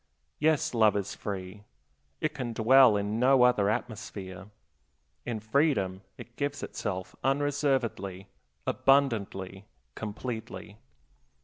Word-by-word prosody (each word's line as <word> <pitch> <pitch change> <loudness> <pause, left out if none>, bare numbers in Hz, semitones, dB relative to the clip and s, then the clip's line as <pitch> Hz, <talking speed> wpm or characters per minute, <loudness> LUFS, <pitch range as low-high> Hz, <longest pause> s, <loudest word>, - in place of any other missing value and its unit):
Yes, 155 -3 +2
love 110 -3 +4
is 100 -1 -3
free; 100 0 -6 0.6
it 155 0 0
can 125 -5 -4
dwell 115 0 +6
in 105 +2 -2
no 130 0 +5
other 120 -5 +4
atmosphere. 100 -4 -5 0.8
In 115 -2 -2
freedom 110 - +1 0.2
it 120 - -12
gives 145 0 -2
itself 95 -3 -5
unreservedly, 135 -9 0 0.4
abundantly, 105 -8 +1 0.3
completely. 110 -1 -6
110 Hz, 100 wpm, -29 LUFS, 100-135 Hz, 0.8 s, dwell